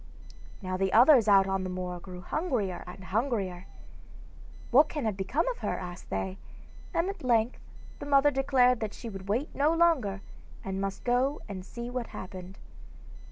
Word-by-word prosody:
Now 185 0 -2
the 190 0 0
others 245 -1 +7
out 195 -2 +6
on 195 0 -1
the 185 - -3
moor 180 -1 -4
grew 180 0 -9
hungrier 220 - -2
and 180 +2 -10
hungrier. 195 -3 -2 1.0
'What 285 +5 +6
can 295 -6 -3
have 215 -3 0
become 195 - -1
of - - -4
her?' - - -2
asked 180 -1 -8
they, 190 0 -3 0.5
and 335 +2 0
at 395 -6 -5
length 235 -1 +2 0.4
the - - -7
mother 285 0 +5
declared 260 -2 +3
that 215 -2 -4
she 235 - -7
would 195 -2 -9
wait 245 +9 -1
no 290 +3 +2
longer, 275 -13 +2 0.4
and 195 0 -3
must 195 0 -4
go 255 +4 +1
and 190 -3 -6
see 235 +5 -7
what 245 -2 -3
had - - -8
happened. 185 0 -9
220 Hz, 175 wpm, -29 LUFS, 190-270 Hz, 1.0 s, others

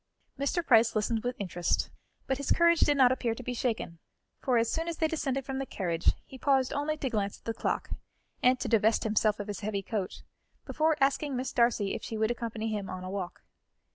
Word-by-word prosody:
Mr. 330 +5 0
Price 230 -2 +5
listened 220 +1 0
with 245 0 -2
interest, 175 -3 -1 0.3
but 265 - 0
his 280 - -2
courage 340 -1 +5
did 290 -1 +4
not 255 -2 +6
appear 240 -3 0
to 250 - -8
be 250 - -3
shaken, 225 -9 -2 0.4
for 255 -3 +1
as 230 0 +3
soon 325 +7 -2
as 335 -2 -3
they 320 - +2
descended 275 -4 -2
from 270 -1 -3
the 270 - -2
carriage, 170 -4 0
he 265 - -12
paused 265 -2 +2
only 300 +2 -1
to 285 - -2
glance 205 -5 -1
at - - -30
the 225 - -1
clock, - - -2 0.5
and 255 0 +4
to - - -2
divest 220 -1 +3
himself 215 -1 +2
of 205 - -4
his 205 -3 -4
heavy 200 -1 -2
coat, 200 -2 -4 0.4
before 310 0 +1
asking 275 +1 +1
Miss 255 +1 -3
Darcy 235 -5 +2
if - - -4
she 225 - -4
would 220 +1 +1
accompany 230 -2 -3
him 205 -2 -3
on 185 - -6
a 185 - -5
walk. 190 -3 -5
235 Hz, 220 wpm, -29 LUFS, 210-270 Hz, 0.5 s, not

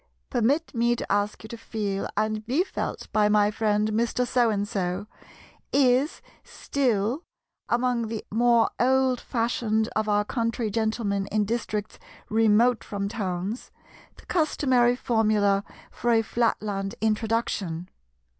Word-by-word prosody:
"Permit 265 +7 +1
me 235 +1 +2
to - - -5
ask 205 +1 0
you - - -8
to 235 - -7
feel 205 -4 -3
and 215 0 0
be 280 +9 +2
felt 385 - -5
by 210 -1 +4
my 210 0 +4
friend 210 0 +1
Mr. 235 +3 0
So 245 -1 +2
and 205 -1 -1
so"—is 215 - -1 0.2
still, 250 - -1 0.5
among 240 -1 +1
the 220 -1 -5
more 235 +1 +3
old 260 0 +3
fashioned 225 -2 0
of 220 0 0
our 205 0 +2
country 230 -1 -1
gentlemen 215 -2 -1
in 210 0 0
districts 215 -1 -3 0.3
remote 225 +2 +4
from 200 -1 -3
towns, 200 0 -3 0.5
the - - -16
customary 260 -7 +2
formula 215 -5 +2 0.3
for 240 - -2
a 225 -1 +4
Flatland 210 -3 -1
introduction. 215 -6 -1
220 Hz, 125 wpm, -26 LUFS, 210-240 Hz, 0.5 s, by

